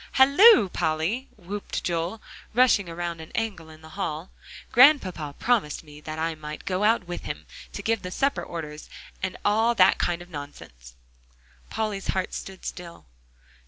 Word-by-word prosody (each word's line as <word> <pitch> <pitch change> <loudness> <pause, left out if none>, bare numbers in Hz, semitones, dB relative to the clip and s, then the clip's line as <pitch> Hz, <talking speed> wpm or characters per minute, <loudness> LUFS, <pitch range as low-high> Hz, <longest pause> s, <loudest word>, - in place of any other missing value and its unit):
"Halloo, 280 - +7
Polly!" 165 +12 -1
whooped 200 +2 -5
Joel, 175 +5 -2 0.3
rushing 235 -7 +4
around 170 0 -4
an 160 - -11
angle 200 -8 -3
in 155 0 -15
the 160 - -12
hall, 165 -3 -4 0.4
"Grandpapa 190 - +4
promised 220 -13 0
me 150 -1 -14
that 155 +1 -6
I 165 +1 -1
might 150 -1 -8
go 185 +1 -1
out 225 0 +3
with 175 - -5
him, - - -6 0.3
to - - -6
give 225 -1 0
the 180 - -6
supper 275 +9 0
orders, 155 -3 -7 0.3
and 185 -1 -3
all 225 +3 +3
that 185 -3 +5
kind 175 0 -1
of 175 - -18
nonsense." - - -10 0.7
Polly's 210 -3 -3
heart 190 -1 -1
stood 190 -1 -8
still. 170 - -8
180 Hz, 160 wpm, -25 LUFS, 160-220 Hz, 0.7 s, Halloo